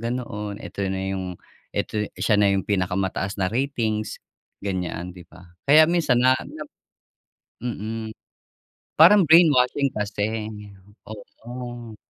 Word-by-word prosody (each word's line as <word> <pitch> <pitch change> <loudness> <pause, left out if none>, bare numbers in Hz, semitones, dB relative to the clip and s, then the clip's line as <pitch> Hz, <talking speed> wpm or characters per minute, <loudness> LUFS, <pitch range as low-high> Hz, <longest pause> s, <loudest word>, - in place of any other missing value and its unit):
ganoon. 115 -4 -4
Eto - - -8
na 95 0 -2
yung 90 -1 -5 0.4
eto 105 -1 -1
siya 105 +3 +2
na 100 - +4
yung 95 -1 0
pinakamataas 95 0 -1
na 95 - +2
ratings 115 -5 -2 0.4
ganyan, 90 -2 -4
di 90 - -11
ba? 90 +2 -15 0.3
Kaya 155 +2 +9
minsan 160 -7 +2
na 130 +1 +5
na 155 - -9 1.0
mm. 110 -1 -5 0.8
Parang 190 +6 +8
brainwashing 145 -4 +5
kasi, 105 +1 -2 0.6
oo. 120 +2 -9
110 Hz, 115 wpm, -23 LUFS, 100-125 Hz, 1.0 s, Kaya